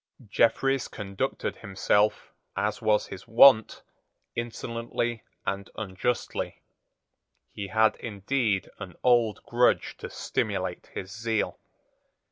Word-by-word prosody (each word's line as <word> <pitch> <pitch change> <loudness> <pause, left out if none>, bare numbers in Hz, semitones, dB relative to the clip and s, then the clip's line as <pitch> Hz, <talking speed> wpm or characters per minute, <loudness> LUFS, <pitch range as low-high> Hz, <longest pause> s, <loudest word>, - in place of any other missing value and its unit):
Jeffreys 130 +5 +2
conducted 100 -2 -3
himself, 105 +2 +1 0.2
as 105 +2 -1
was 110 -1 +3
his 95 - -10
wont, 115 -2 +6 0.5
insolently 115 0 -3 0.2
and 100 0 -3
unjustly. 110 +4 -2 0.9
He 100 - -5
had 110 +2 +3
indeed 105 -1 -1
an 90 -3 -8
old 120 -4 +3
grudge 120 +1 +2
to - - -7
stimulate - - -2
his 95 - -5
zeal. 110 -1 -1
110 Hz, 95 wpm, -27 LUFS, 100-120 Hz, 0.9 s, wont